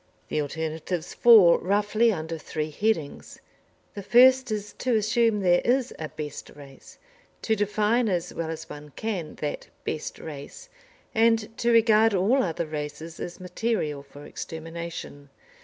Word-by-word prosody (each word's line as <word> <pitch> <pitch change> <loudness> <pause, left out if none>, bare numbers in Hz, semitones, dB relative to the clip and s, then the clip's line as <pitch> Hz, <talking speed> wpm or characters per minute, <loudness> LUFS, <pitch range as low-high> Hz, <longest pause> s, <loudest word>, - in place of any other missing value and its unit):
The 155 - 0
alternatives 160 +3 -4
fall 210 -8 +7
roughly 210 +4 +2
under 160 -3 -4
three 155 0 -4
headings. 165 -4 -2 0.5
The 200 - -6
first 255 +5 +5
is 210 -1 -4
to 250 -2 +1
assume 220 0 +2
there 175 -2 +4
is 255 +1 +1
a 155 -1 -4
best 150 -2 -7
race, 140 -2 -14 0.5
to 220 - +2
define 210 +3 +1
as 180 -2 -2
well 165 -1 -4
as 165 0 -6
one 150 -2 -11
can 190 -8 -4
that 150 -1 -5 0.2
best 155 - -4
race, 160 - -9 0.4
and 225 -1 +2
to 235 - +1
regard 225 -2 +5
all 215 +9 +3
other 170 -4 -2
races 155 +1 -6
as 175 - -6
material 180 -6 -2
for 145 +1 -14
extermination. 165 -3 -7
180 Hz, 140 wpm, -26 LUFS, 155-225 Hz, 0.5 s, fall